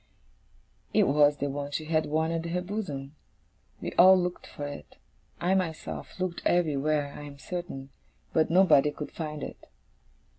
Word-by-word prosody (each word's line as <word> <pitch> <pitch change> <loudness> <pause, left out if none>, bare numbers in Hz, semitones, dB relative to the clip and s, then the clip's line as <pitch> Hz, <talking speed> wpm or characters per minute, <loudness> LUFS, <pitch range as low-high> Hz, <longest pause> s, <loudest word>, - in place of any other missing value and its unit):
It - - +6
was 145 +1 +4
the 140 - -1
one 140 0 -4
she 155 +2 -3
had 155 0 +1
worn 160 +2 +1
at 165 0 -2
her 180 +2 -1
bosom. 155 -8 -5 0.7
We - - -3
all 185 +1 +9
looked 180 0 -3
for 145 - -6
it; 145 - -8 0.4
I 180 +3 +2
myself 180 -1 -3
looked 185 -2 -2
everywhere, 150 -3 +1
I - - -8
am 145 -1 -9
certain 140 -5 -6 0.4
but 160 - +3
nobody 165 -5 +5
could 150 0 -7
find 150 -3 -5
it. - - -8
155 Hz, 155 wpm, -28 LUFS, 145-175 Hz, 0.7 s, all